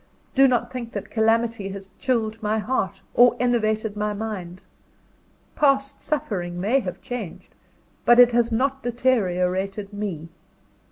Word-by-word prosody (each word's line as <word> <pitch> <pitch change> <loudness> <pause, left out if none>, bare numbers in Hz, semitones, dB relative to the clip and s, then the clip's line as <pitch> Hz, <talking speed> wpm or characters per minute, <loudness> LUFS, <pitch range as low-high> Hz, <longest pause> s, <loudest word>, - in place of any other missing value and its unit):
Do 270 0 +6
not 240 -1 0
think 235 -2 -6
that 200 - -6
calamity 225 -2 +1
has 195 0 -9
chilled 225 -4 -1
my 215 0 0
heart, 205 -3 -2
or 245 0 +6
enervated 220 -3 0
my 210 0 -1
mind. 190 -4 -6 0.9
Past 275 -1 +1
suffering 180 - -3
may 220 +9 +2
have 185 -8 -6
changed, 230 -9 -7 0.5
but 240 - +6
it 245 0 +8
has 235 0 +2
not 270 +4 0
deteriorated 200 -5 0
me. 185 -6 -5
220 Hz, 130 wpm, -23 LUFS, 195-245 Hz, 0.9 s, it